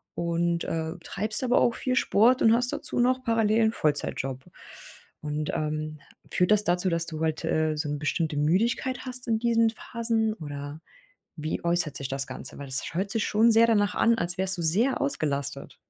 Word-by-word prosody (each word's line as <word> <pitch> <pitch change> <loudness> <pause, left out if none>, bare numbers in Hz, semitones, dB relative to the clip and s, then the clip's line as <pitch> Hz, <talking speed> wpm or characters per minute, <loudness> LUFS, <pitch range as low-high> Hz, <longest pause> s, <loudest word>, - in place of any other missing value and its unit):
und, 170 0 -1
äh, 160 0 -3
treibst 215 +5 -3
aber 245 -1 +3
auch 235 - +2
viel 255 -1 -1
Sport 245 +1 +3
und 225 - +5
hast 245 +1 +3
dazu - - -3
noch 255 +1 +2
parallel 225 -1 +2
'n 220 - +2
Vollzeitjob. 135 -3 -2 0.8
Und, 150 0 -3
ähm, 155 0 -3 0.3
führt 180 +3 +1
das 210 -1 +5
dazu, 180 +2 +2
dass 170 -1 +2
du 155 -2 -6
halt, 160 -1 -1
äh, 155 0 0
so 150 0 -2
'ne 145 - -2
bestimmte 155 0 -1
Müdigkeit 230 - +1
hast 250 -1 -4
in 225 -1 +2
diesen 230 -1 +3
Phasen 225 -2 -1
oder 145 -1 -7 0.6
wie 155 +1 -4
äußert 170 -3 0
sich 135 -2 -4
das 135 0 -2
Ganze? - - -7
Weil 140 - -7
das 130 0 -1
sch - - -7
hört 195 +4 -1
sich 225 -1 0
schon 220 +2 +4
sehr 225 +1 +6
danach 205 -2 +2
an, 230 0 +3
als 175 -1 -1
wärst 190 -1 +1
du - - -2
sehr 215 +12 +2
ausgelastet. 140 - -2
175 Hz, 190 wpm, -26 LUFS, 155-230 Hz, 0.8 s, sehr